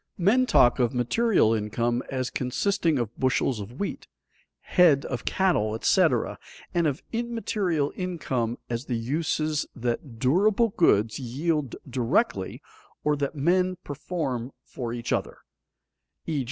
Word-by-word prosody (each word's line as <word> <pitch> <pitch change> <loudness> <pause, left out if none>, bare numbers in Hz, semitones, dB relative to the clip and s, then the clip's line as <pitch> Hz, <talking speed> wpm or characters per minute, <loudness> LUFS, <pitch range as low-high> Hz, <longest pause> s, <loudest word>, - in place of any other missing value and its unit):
Men 220 +8 +3
talk 120 - +5
of 120 -1 +1
material 125 - +3
income 115 +3 0
as 130 -1 -2
consisting 165 +5 0
of 120 -2 -3
bushels 130 -2 +1
of 110 +5 -8
wheat, 200 - -4 0.5
head 160 -7 +4
of 125 - -4
cattle, 140 - +1
etc., 115 - +2 0.3
and 170 -2 +2
of 145 +1 -2
immaterial 215 -10 -1
income 135 -11 -2
as 120 +2 -3
the 120 - -2
uses 155 +4 -1
that 120 0 -3
durable 195 - +3
goods 110 - +2
yield 140 +2 -1
directly 130 - 0 0.4
or 150 0 +2
that 140 +1 -2
men 180 +5 +2
perform 140 -4 -4
for 120 -3 -6
each 120 0 -3
other, - - -2 0.9
_e. 155 -3 0
140 Hz, 125 wpm, -26 LUFS, 120-180 Hz, 0.9 s, talk